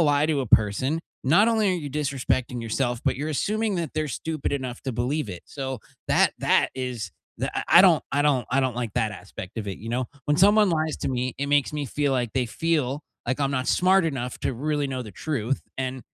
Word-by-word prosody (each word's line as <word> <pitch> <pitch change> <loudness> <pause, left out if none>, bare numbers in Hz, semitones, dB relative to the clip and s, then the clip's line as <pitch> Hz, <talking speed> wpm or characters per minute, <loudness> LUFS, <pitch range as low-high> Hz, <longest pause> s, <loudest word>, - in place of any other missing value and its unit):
lie 145 -1 +3
to 155 -2 +1
a 130 - -2
person, 110 +10 +2 0.2
not 175 - +5
only 220 -3 +2
are - - +1
you 150 -5 -4
disrespecting 130 -4 -1
yourself, 120 +1 -1
but - - +1
you're 145 +3 -3
assuming 215 +7 0
that 165 -4 -3
they're 155 0 0
stupid 155 +4 -3
enough 130 -3 -3
to 130 - -3
believe 125 +2 -1
it, 90 -3 -7
so, 130 -4 -5 0.3
that - - +4
that - - +3
is 125 -6 -4 0.3
the - - -1
I - - -1 0.2
I - - +11
don't - - +5
I 145 +1 +2
don't 135 -6 +2
I 135 - +3
don't 130 -3 -1
like 120 -4 -3
that 110 -3 +1
aspect 95 -1 -9
of 105 - -4
it, 95 - -5
you 115 - -8
know? 125 +2 0 0.2
When 150 0 +2
someone 205 +2 +5
lies 155 -1 0
to - - -2
me, 125 -1 -1
it 140 - -1
makes 145 0 +2
me 145 -2 -2
feel 145 +2 0
like 125 -3 -1
they 130 -2 +1
feel 150 0 -1 0.2
like 130 +3 -1
I'm 140 - +1
not 130 -2 -1
smart 185 0 +4
enough 125 -5 -3
to 130 - -1
really 145 +2 -1
know 130 -1 -3
the 110 - -9
truth, 135 - -2 0.2
and, 130 -1 -3
135 Hz, 230 wpm, -25 LUFS, 125-150 Hz, 0.3 s, I